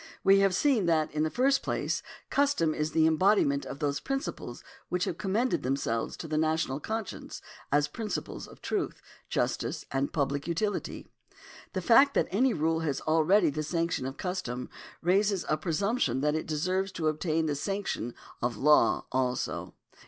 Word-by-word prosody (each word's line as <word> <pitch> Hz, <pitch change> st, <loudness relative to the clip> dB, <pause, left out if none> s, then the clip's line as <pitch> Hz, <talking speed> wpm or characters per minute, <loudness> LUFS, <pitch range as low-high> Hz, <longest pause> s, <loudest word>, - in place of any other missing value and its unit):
We 195 Hz, 0 st, +6 dB
have 195 Hz, -2 st, +3 dB
seen 240 Hz, -7 st, +2 dB
that, 160 Hz, -2 st, +2 dB
in 150 Hz, -, -1 dB
the 155 Hz, -, +2 dB
first 265 Hz, -, +2 dB
place, -, -, -1 dB, 0.3 s
custom 280 Hz, -, +2 dB
is 150 Hz, 0 st, -1 dB
the 160 Hz, -1 st, +3 dB
embodiment 160 Hz, -3 st, +3 dB
of -, -, -6 dB
those 140 Hz, -1 st, -1 dB
principles 270 Hz, -, -4 dB, 0.3 s
which 180 Hz, 0 st, 0 dB
have 170 Hz, -, -3 dB
commended 215 Hz, +6 st, 0 dB
them 130 Hz, +2 st, 0 dB
selves 115 Hz, -4 st, -2 dB
to 165 Hz, -, -6 dB
the 155 Hz, 0 st, 0 dB
national 155 Hz, -3 st, 0 dB
conscience 220 Hz, +5 st, -5 dB, 0.3 s
as 145 Hz, +1 st, +3 dB
principles 215 Hz, +1 st, -5 dB
of -, -, -16 dB
truth, -, -, -2 dB, 0.3 s
justice -, -, -1 dB
and 135 Hz, +1 st, 0 dB
public 140 Hz, 0 st, -1 dB
utility. 205 Hz, +5 st, -2 dB, 0.7 s
The 185 Hz, -, -2 dB
fact 275 Hz, +6 st, +6 dB
that -, -, +3 dB
any 250 Hz, +7 st, +3 dB
rule 160 Hz, -2 st, +1 dB
has 150 Hz, -4 st, -1 dB
already 160 Hz, +4 st, +3 dB
the 155 Hz, -, -3 dB
sanction 165 Hz, -3 st, -1 dB
of 135 Hz, -, -6 dB
custom 155 Hz, -10 st, -4 dB, 0.3 s
raises 195 Hz, +1 st, +2 dB
a 155 Hz, -, +2 dB
presumption 160 Hz, -, 0 dB
that 150 Hz, +1 st, +2 dB
it 155 Hz, -, -2 dB
deserves 185 Hz, +5 st, -1 dB
to 160 Hz, -2 st, -1 dB
obtain 155 Hz, +1 st, 0 dB
the 150 Hz, -, 0 dB
sanction 190 Hz, -, -3 dB, 0.3 s
of 120 Hz, -2 st, -1 dB
law 150 Hz, +5 st, +4 dB
also. 130 Hz, -1 st, -2 dB
160 Hz, 165 wpm, -29 LUFS, 150-195 Hz, 0.7 s, We